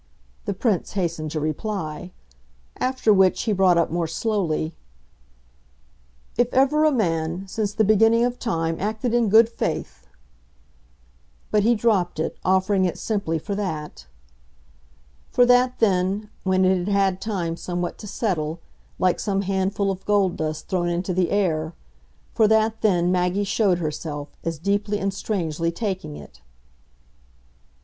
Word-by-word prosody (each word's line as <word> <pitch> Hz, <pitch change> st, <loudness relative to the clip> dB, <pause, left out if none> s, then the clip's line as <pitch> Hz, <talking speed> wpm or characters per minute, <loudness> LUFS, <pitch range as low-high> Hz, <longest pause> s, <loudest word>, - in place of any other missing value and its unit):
the -, -, -1 dB
Prince 200 Hz, -2 st, 0 dB
hastened 165 Hz, -5 st, -2 dB
to 155 Hz, -, -3 dB
reply. 160 Hz, +1 st, -4 dB, 0.7 s
After 255 Hz, -4 st, +2 dB
which 190 Hz, -2 st, +3 dB
he 220 Hz, -, 0 dB
brought 185 Hz, -3 st, +4 dB
up 170 Hz, -, +1 dB
more 170 Hz, -1 st, -1 dB
slowly: 165 Hz, -3 st, -1 dB, 1.7 s
"If 240 Hz, 0 st, +3 dB
ever 290 Hz, +4 st, +4 dB
a 310 Hz, -, +4 dB
man, 170 Hz, -, -1 dB
since 205 Hz, +1 st, -2 dB
the 220 Hz, -, +3 dB
beginning 225 Hz, +3 st, +4 dB
of 245 Hz, 0 st, -3 dB
time, 165 Hz, -7 st, -1 dB
acted 220 Hz, +3 st, -2 dB
in 235 Hz, -3 st, +2 dB
good 220 Hz, +2 st, +7 dB
faith!" 65 Hz, -, -4 dB, 1.4 s
But 210 Hz, -, +3 dB
he 235 Hz, +3 st, +3 dB
dropped 205 Hz, -7 st, +1 dB
it, 160 Hz, -, -2 dB
offering 190 Hz, +1 st, +2 dB
it 180 Hz, -, -2 dB
simply 200 Hz, -7 st, -1 dB
for 200 Hz, +6 st, -5 dB
that. 150 Hz, -, -5 dB, 1.2 s
For 245 Hz, -, +4 dB
that 250 Hz, +1 st, +4 dB
then, 200 Hz, 0 st, +1 dB
when 185 Hz, 0 st, +2 dB
it 185 Hz, 0 st, +3 dB
had 175 Hz, -, -4 dB
had 195 Hz, -2 st, +1 dB
time 180 Hz, -7 st, -2 dB
somewhat 175 Hz, 0 st, -4 dB
to 210 Hz, -, -8 dB
settle, 175 Hz, -6 st, -2 dB, 0.4 s
like 185 Hz, -1 st, +1 dB
some 195 Hz, -1 st, -1 dB
handful 195 Hz, +1 st, 0 dB
of 190 Hz, 0 st, -6 dB
gold 200 Hz, -3 st, +2 dB
dust 155 Hz, -1 st, -4 dB
thrown 180 Hz, -2 st, 0 dB
into 180 Hz, +2 st, -2 dB
the 180 Hz, -1 st, +1 dB
air 165 Hz, -5 st, 0 dB, 0.6 s
for 220 Hz, -2 st, +4 dB
that 220 Hz, +1 st, +2 dB
then 180 Hz, -5 st, +2 dB
Maggie 180 Hz, +2 st, +1 dB
showed 200 Hz, -2 st, +2 dB
herself, 150 Hz, -2 st, -4 dB
as 165 Hz, -1 st, -3 dB
deeply 205 Hz, +5 st, 0 dB
and 195 Hz, -1 st, -2 dB
strangely 165 Hz, -5 st, -2 dB
taking 190 Hz, -, -4 dB
it. 75 Hz, -2 st, -13 dB
190 Hz, 145 wpm, -23 LUFS, 170-215 Hz, 1.7 s, good